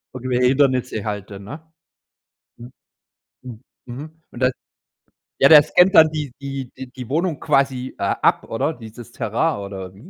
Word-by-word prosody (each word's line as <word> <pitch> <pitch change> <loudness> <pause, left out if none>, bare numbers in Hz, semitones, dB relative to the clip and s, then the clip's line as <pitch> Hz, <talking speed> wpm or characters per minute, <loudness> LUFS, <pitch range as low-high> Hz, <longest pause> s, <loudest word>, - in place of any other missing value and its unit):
Irgendwelche 125 0 0
Hindernisse 130 -5 +1
halt 105 -2 -5
dann, 100 -1 -10
ne? 145 +10 -9 1.0
Mhm, 120 +2 -12 0.7
mhm, 120 -3 -10 0.3
mhm, 150 +6 -10
und 120 - -11
da 130 0 +3 0.9
ja, 140 - +6
der 150 -2 +9
scannt 180 +2 +4
dann 160 -1 +8
die 150 -3 -4
die 135 -2 -6
die 130 - -7
die 125 -3 -9
Wohnung 165 +2 -1
quasi, 135 -3 0
äh, - - -6
ab, - - +1
oder? 135 +8 -2
Dieses 115 -2 -12
Terrain - - -1
oder 95 -2 -7
wie. 105 - -16
130 Hz, 160 wpm, -21 LUFS, 115-145 Hz, 1.0 s, der